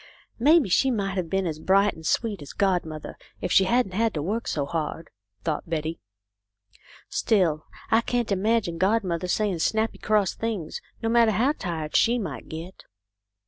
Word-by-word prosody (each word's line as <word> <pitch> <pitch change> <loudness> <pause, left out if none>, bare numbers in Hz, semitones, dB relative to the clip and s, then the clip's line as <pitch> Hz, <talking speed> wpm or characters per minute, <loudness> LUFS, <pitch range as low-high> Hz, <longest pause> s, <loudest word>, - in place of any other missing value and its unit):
" - - -39
Maybe 325 -6 +6
she 230 +8 +3
might 200 -5 -1
have 175 -3 -2
been 195 +1 0
as 155 -3 -3
bright 195 +4 +3
and 160 - -12
sweet 205 +1 0
as 145 - -9
godmother, 175 -6 -1 0.2
if - - -3
she 190 - +6
hadn't 240 0 +2
had 220 +2 0
to 150 - -1
work 220 +7 -2
so 145 -2 -1
hard," 160 +1 -4 0.3
thought 160 0 -2
Betty. 160 0 -2 0.6
" 100 0 -31 0.2
Still 170 -8 +1 0.2
I 225 +1 +5
can't 240 -2 -1
imagine 200 -3 +1
godmother 185 -3 +1
saying 195 -2 0
snappy 220 +6 0
cross 210 -3 +2
things, 215 -8 -4 0.2
no 225 - +1
matter 230 -1 +5
how 245 +8 +3
tired 165 - -4
she 235 +1 +4
might 180 - -5
get." 165 +4 -8
190 Hz, 175 wpm, -25 LUFS, 165-225 Hz, 0.6 s, Maybe